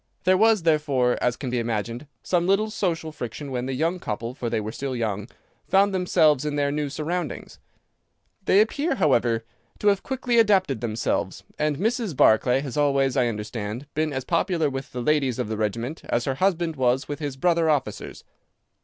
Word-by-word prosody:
There 185 +1 +4
was, 215 -1 +4
therefore, 145 -6 +2
as 120 -1 +1
can 130 -3 -4
be 125 - 0
imagined, 115 +4 -3 0.2
some 175 -1 +1
little 210 +3 +2
social 165 -6 -2
friction 140 0 -6
when 125 0 -2
the 135 - -2
young 165 +6 0
couple 115 -3 -4
(for 120 -3 -4
they 110 - 0
were 110 0 -4
still 135 +2 -4
young) 105 -3 -2 0.4
found 195 +1 +3
themselves 155 -6 +3
in 150 -1 -2
their 140 -1 +1
new 150 0 -2
surroundings. 155 +1 -4 0.9
They 200 - +5
appear, 280 +7 0
however, 120 - +2 0.3
to 210 - +3
have 200 -1 +2
quickly 250 -3 0
adapted 190 - +3
themselves, 115 -1 -2 0.2
and 150 -1 0
Mrs. 220 - -1
Barclay 125 +4 +4
has 140 -1 -6
always, 140 -3 +2
I 125 - +3
understand, 105 +2 -4
been 155 0 0
as 130 -2 -4
popular 165 -2 +1
with 135 0 -6
the 125 -1 -4
ladies 140 -4 +1
of - - -3
the 110 - -2
regiment 115 +8 -3
as 120 0 -1
her 135 - 0
husband 170 0 0
was 130 +1 +1
with 145 - -5
his 145 -3 -4
brother 170 +2 +2
officers. 135 -8 -2
145 Hz, 185 wpm, -24 LUFS, 125-175 Hz, 0.9 s, They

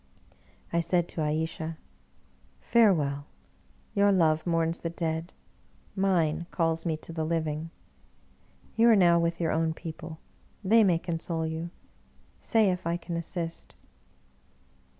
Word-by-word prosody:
I 170 - +3
said 175 0 +1
to 160 - -4
Ayesha, 160 +1 -2 0.4
" 65 0 -35
Farewell! 150 -11 +3 0.7
your 200 0 +4
love 160 -3 +2
mourns 165 0 +1
the 165 - -3
dead, 165 0 -3 0.6
mine 170 -4 +1
calls 165 0 0
me 160 -2 0
to 165 - -10
the 160 -1 -2
living. 160 -1 -2 1.1
You 230 +1 +5
are 225 - +7
now 175 -3 +5
with 170 0 0
your 165 -2 +1
own 160 0 0
people, 160 -1 -8 0.5
they 220 +4 +5
may 180 -4 +4
console 165 -1 -3
you 160 +1 -4 0.4
— - - -35 0.3
say 220 -4 +3
if 180 -2 -4
I 170 +1 0
can 175 0 -6
assist.' 170 0 -5
165 Hz, 135 wpm, -28 LUFS, 160-175 Hz, 1.1 s, are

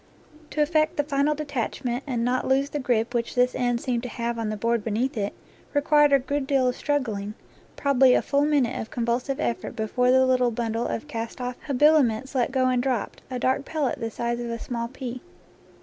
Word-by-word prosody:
To 300 - +1
effect 310 0 +1
the 290 - +2
final 285 +1 +1
detachment, 265 -3 -3
and 240 -3 -1
not 250 +1 0
lose 270 +2 +2
the 295 - -2
grip 240 -2 0
which 235 -1 -2
this 250 0 +3
end 245 -1 0
seemed 245 -3 -1
to 250 - -6
have 235 0 -3
on 225 -2 -2
the 215 - -3
board 230 +1 0
beneath 230 +5 -1
it, 205 -2 -1 0.4
required 295 0 +4
a 275 - +7
good 275 +1 -2
deal 270 -2 +2
of 250 - 0
struggling, 220 -8 -2 0.4
probably 265 -2 +4
a - - +2
full 280 +1 +2
minute 285 -5 +1
of 220 - -7
convulsive 245 +3 -1
effort 235 -3 -2
before 250 +2 +1
the 260 +1 +5
little 255 -1 +3
bundle 230 0 -2
of 225 - -4
cast 225 +1 -5
off 250 0 -4
habiliments 270 -3 +3
let 255 -1 +1
go 260 -1 +2
and 250 -1 +2
dropped, 250 -4 -2
a 255 - -3
dark 260 +2 +1
pellet 295 -5 -2
the 230 -1 -2
size 235 +1 -2
of 240 -1 -4
a 230 - -3
small 235 0 -4
pea. 255 0 -7
250 Hz, 210 wpm, -25 LUFS, 235-275 Hz, 0.4 s, a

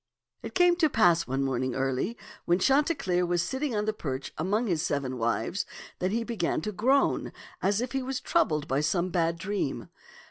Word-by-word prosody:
'* - - -49
It - - -8
came 355 -1 +5
to 320 -3 +3
pass 175 - +3
one 135 +1 0
morning 130 -1 -1
early, 135 - -1 0.3
when 175 - +3
Chanti 285 - +3
cleer 180 -1 0
was 175 -1 +1
sitting 265 +6 -2
on 210 0 0
the 215 - 0
perch 135 -9 -5
among 205 +9 0
his 170 -7 0
seven 135 -4 -2
wives, 115 - 0 0.4
that 185 - 0
he 230 +3 0
began 230 -7 -1
to 210 - -3
groan 260 +8 +2 0.3
as 200 +3 +1
if 245 - -3
he 270 - -1
was 260 0 -3
troubled 155 -1 +1
by 135 +2 +1
some 170 +4 +1
bad 170 -2 +1
dream. 190 -5 -3
180 Hz, 200 wpm, -28 LUFS, 150-235 Hz, 0.4 s, came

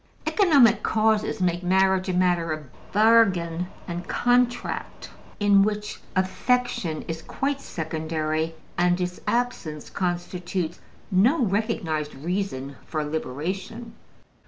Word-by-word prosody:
Economic 290 - +5
causes 220 0 +1
make 175 -1 +1
marriage 190 +1 +2
a - - 0
matter 175 -2 +2
of 155 -1 -4 0.3
bargain 190 -6 +4 0.2
and 175 0 -5
contract, 245 0 0 0.3
in 205 -1 +5
which 210 +1 -1
affection 190 -3 0
is 165 0 -5
quite 275 +7 -2
secondary, 160 - -2 0.2
and 175 0 +3
its 180 0 -3
absence 235 -11 -2
constitutes 175 -1 -3 0.3
no 235 - +4
recognized 190 -8 -1
reason 145 -4 -3
for 155 -2 -2
liberation. 180 - -4
185 Hz, 105 wpm, -25 LUFS, 165-215 Hz, 0.3 s, Economic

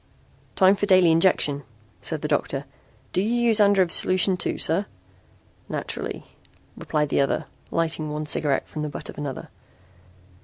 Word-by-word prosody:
"Time 190 0 +5
for 205 0 -2
daily 185 -4 +5
injection," 160 -4 +3 0.4
said - - -2
the - - 0
doctor. - - -1 0.5
"Do 185 - +2
you 225 +4 0
use 230 -2 +3
Andrev's 200 -4 +4
solution 185 +1 +3
too, 180 - -2
sir?" 180 +6 0 0.8
"Naturally," - - -4 0.5
replied 150 -1 -2
the - - +2
other, 140 - -1 0.2
lighting 160 -2 -1
one 150 +1 -4
cigarette 145 -2 0
from 155 - -6
the 150 - -3
butt 145 - -7
of - - -9
another. 140 -3 -6
165 Hz, 150 wpm, -24 LUFS, 150-195 Hz, 0.8 s, Time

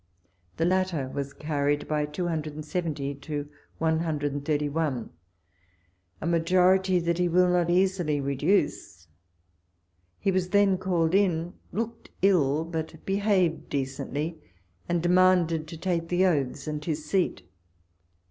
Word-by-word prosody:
The 165 - +1
latter 180 -7 0
was 140 0 -4
carried 145 -1 -1
by 150 -1 0
270 155 -2 -3
to 145 +1 -5 0.3
131, 150 -3 -1 1.1
a - - -5
majority 180 +2 +3
that 170 0 -1
he 180 - +3
will 180 +1 +4
not 175 -1 +2
easily 180 -4 +2
re 140 0 -1
duce. 140 - 0 1.1
He 195 - 0
was 185 -1 0
then 200 -1 +3
called 175 -3 +1
in, 175 -3 +2 0.2
looked 230 +2 -4
ill, 160 -5 +3
but 160 -1 -4
behaved 195 -4 +1
decently, 145 +3 -3 0.5
and 170 -1 0
demanded 175 -3 +3
to 165 - -8
take 170 -1 -1
the 180 +1 +3
oaths 140 -5 0
and 150 -1 -4
his 155 -1 -3
seat. 170 - 0
165 Hz, 120 wpm, -27 LUFS, 150-180 Hz, 1.1 s, will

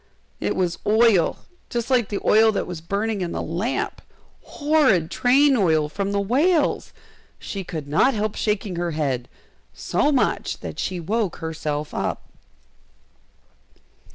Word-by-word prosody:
it - - -1
was 180 -2 -1
oil, 215 -5 +3 0.2
just 240 +2 -3
like 245 -5 +2
the 200 - -2
oil 220 +1 +6
that 210 - -2
was 175 -3 -7
burning 200 +4 -2
in 175 -1 -3
the - - -3
lamp! 190 - -2 0.4
horrid 285 - +2
train 270 +3 +4
oil 160 -8 +2
from 200 +6 -3
the 200 - 0
whales! 285 - +1 0.5
She 195 -2 -6
could 160 -5 -6
not 225 - +3
help 215 0 -1
shaking 210 -4 -2
her 175 -1 -2
head, 130 -5 -1 0.5
so 295 - 0
much 275 - 0
that - - -7
she 185 -1 -2
woke 200 +2 -1
herself 155 -2 -4
up! - - -2
200 Hz, 140 wpm, -23 LUFS, 170-235 Hz, 0.5 s, oil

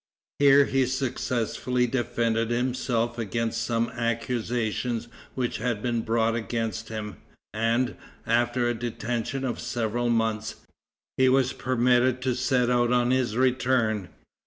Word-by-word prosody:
Here 140 0 +7
he 135 -1 +1
successfully 125 -1 -1
defended 115 -2 0
himself 120 -1 -1
against 115 +1 -2
some 115 0 0
accusations 115 0 -2 0.3
which 125 -2 -1
had 115 -3 -2
been 120 -2 0
brought 115 0 +1
against 115 -1 -3
him, 105 -2 -5 0.4
and, 115 +3 +1 0.3
after 120 +1 +1
a 120 - +1
detention 120 +3 -3
of 125 - -3
several 120 0 -1
months, 115 -2 0 0.6
he 130 0 +5
was 130 -1 +3
permitted 125 0 +2
to 130 -1 +1
set 125 0 +1
out 120 -1 +2
on 125 0 +3
his 125 -4 +1
return. 125 -6 +1
120 Hz, 125 wpm, -26 LUFS, 115-125 Hz, 0.6 s, Here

